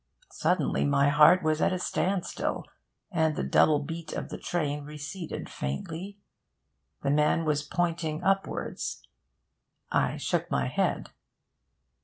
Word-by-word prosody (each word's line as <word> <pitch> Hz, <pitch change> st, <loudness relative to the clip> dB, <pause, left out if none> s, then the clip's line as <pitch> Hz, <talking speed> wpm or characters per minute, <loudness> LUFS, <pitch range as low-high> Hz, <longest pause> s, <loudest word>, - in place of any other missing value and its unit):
Suddenly 180 Hz, -5 st, +1 dB
my 140 Hz, 0 st, +3 dB
heart 150 Hz, +5 st, +6 dB
was 155 Hz, 0 st, +1 dB
at -, -, +3 dB
a 185 Hz, -, 0 dB
standstill, 185 Hz, +1 st, -1 dB, 0.5 s
and 160 Hz, -4 st, +2 dB
the -, -, -2 dB
double 155 Hz, -, +4 dB
beat 160 Hz, +2 st, -5 dB
of -, -, -4 dB
the -, -, -5 dB
train 150 Hz, -4 st, -2 dB
receded 150 Hz, +4 st, -6 dB
faintly. 160 Hz, -, -5 dB, 0.9 s
The 140 Hz, -, +2 dB
man 150 Hz, +2 st, +3 dB
was 150 Hz, -2 st, +1 dB
pointing 165 Hz, +1 st, -2 dB
upwards...I 195 Hz, -, -3 dB
shook -, -, -1 dB
my 65 Hz, -, +1 dB
head. -, -, -1 dB
155 Hz, 120 wpm, -28 LUFS, 145-175 Hz, 0.9 s, heart